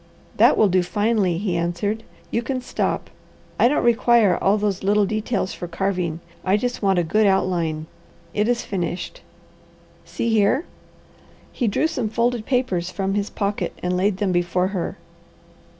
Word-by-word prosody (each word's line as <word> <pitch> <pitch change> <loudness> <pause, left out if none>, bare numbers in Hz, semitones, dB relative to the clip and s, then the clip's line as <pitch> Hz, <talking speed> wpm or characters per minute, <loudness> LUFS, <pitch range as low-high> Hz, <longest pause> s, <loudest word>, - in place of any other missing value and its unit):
"That - - +5
will 215 - +5
do 185 -1 +3
finely," 205 -1 +1
he 185 -1 -1
answered. 175 +6 -1 0.3
"You 230 - +1
can 255 +2 -2
stop. 250 - -2 0.5
I - - +6
don't 295 - +1
require 235 -4 +4
all 200 +2 +2
those 205 -2 -1
little 205 +1 +3
details 215 -1 -2
for 175 - -6
carving, 175 -2 -2 0.2
I 190 +2 +3
just 245 +3 -3
want 195 -2 +2
a 175 - +3
good 210 +6 +2
outline. 170 -5 0 0.5
It 210 +1 +1
is 245 0 +1
finished. 175 -2 -4 0.8
See 170 +7 -3
here!" 225 - +2 0.9
He 245 - -1
drew 210 - +1
some 260 -9 -1
folded 235 0 0
papers 220 -10 0
from 195 +1 -2
his 205 0 -1
pocket 200 0 -2
and 180 0 0
laid 190 +1 +1
them 195 -1 0
before 175 +1 +1
her. 190 -4 -3
200 Hz, 160 wpm, -22 LUFS, 180-225 Hz, 0.9 s, I